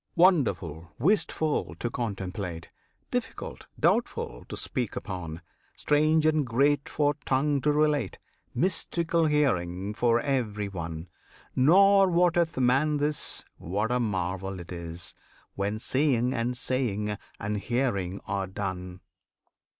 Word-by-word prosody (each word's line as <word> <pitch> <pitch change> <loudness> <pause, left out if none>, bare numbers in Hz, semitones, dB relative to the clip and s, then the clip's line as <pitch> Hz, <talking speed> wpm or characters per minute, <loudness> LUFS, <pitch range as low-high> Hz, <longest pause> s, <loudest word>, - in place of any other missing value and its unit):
Wonderful, 105 - +2
wistful, 160 -5 +1
to 120 - -3
contemplate! 95 -6 -4 0.4
Difficult, - - -4
doubtful, - - 0
to - - -5
speak - - -3
upon! 85 -2 -5 0.3
Strange 155 +1 +3
and 155 -1 +3
great 140 +4 +2
for 145 -1 +2
tongue 140 +1 +1
to 150 - +3
relate, 150 - +1 0.4
Mystical 170 +1 +1
hearing 100 - +1
for 120 +1 +3
every 115 -6 -1
one! 85 -3 -6 0.5
Nor 195 +8 +6
wotteth 175 -2 +2
man 135 +4 +3
this, 150 +1 -1
what 105 +7 -1
a 125 - +2
marvel 95 -3 -2
it 85 +1 -9
is, 85 -1 -5 0.4
When 100 +2 -2
seeing, 130 0 +1
and 125 0 -1
saying, 105 -5 0 0.2
and 105 +1 -2
hearing 100 -5 -1
are 100 -1 -2
done! 95 -1 -5
120 Hz, 115 wpm, -28 LUFS, 95-150 Hz, 0.5 s, Nor